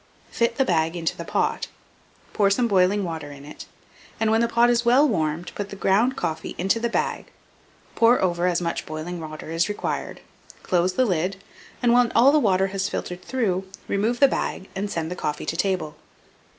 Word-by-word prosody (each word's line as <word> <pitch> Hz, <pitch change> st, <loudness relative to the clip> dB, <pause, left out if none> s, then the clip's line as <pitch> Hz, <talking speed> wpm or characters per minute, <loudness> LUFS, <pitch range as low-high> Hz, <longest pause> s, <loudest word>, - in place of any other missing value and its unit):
Fit 235 Hz, 0 st, 0 dB
the 270 Hz, -, +3 dB
bag 165 Hz, -4 st, +1 dB
into 165 Hz, -2 st, -2 dB
the -, -, -6 dB
pot, -, -, -1 dB, 0.7 s
pour 200 Hz, -2 st, +3 dB
some 235 Hz, +4 st, +2 dB
boiling 195 Hz, 0 st, +3 dB
water 160 Hz, -4 st, -5 dB
in 140 Hz, 0 st, -11 dB
it, 150 Hz, -, -10 dB, 0.5 s
and, 220 Hz, -1 st, +2 dB
when 225 Hz, +1 st, +3 dB
the 235 Hz, -, +2 dB
pot 235 Hz, +1 st, +3 dB
is 240 Hz, 0 st, +2 dB
well 255 Hz, +5 st, +5 dB
warmed, 165 Hz, -, -1 dB
put 205 Hz, -1 st, -5 dB
the 200 Hz, -, -7 dB
ground 210 Hz, +7 st, +2 dB
coffee 160 Hz, 0 st, -3 dB
into 195 Hz, +5 st, +1 dB
the 235 Hz, +1 st, -1 dB
bag; -, -, -2 dB, 0.7 s
pour 235 Hz, +2 st, +4 dB
over 175 Hz, -1 st, +1 dB
as 175 Hz, -1 st, +1 dB
much 170 Hz, -, -3 dB
boiling 155 Hz, +3 st, -5 dB
water 155 Hz, 0 st, -8 dB
as 165 Hz, 0 st, -2 dB
is -, -, -6 dB
required, 205 Hz, -, -4 dB, 0.4 s
close 180 Hz, 0 st, +1 dB
the 255 Hz, -, +2 dB
lid, 185 Hz, -1 st, 0 dB, 0.5 s
and, 240 Hz, -1 st, +4 dB
when 245 Hz, -1 st, +4 dB
all 260 Hz, +4 st, +6 dB
the 305 Hz, -, +4 dB
water 195 Hz, -6 st, +2 dB
has 195 Hz, 0 st, -2 dB
filtered 180 Hz, -2 st, -5 dB
through, 195 Hz, -7 st, -1 dB, 0.2 s
remove 220 Hz, +5 st, 0 dB
the 280 Hz, -, +7 dB
bag, 195 Hz, -, -3 dB
and 200 Hz, +2 st, -3 dB
send 165 Hz, -3 st, -3 dB
the -, -, -3 dB
coffee 150 Hz, -3 st, -3 dB
to -, -, -2 dB
table. 180 Hz, -4 st, -1 dB
190 Hz, 200 wpm, -24 LUFS, 170-235 Hz, 0.7 s, the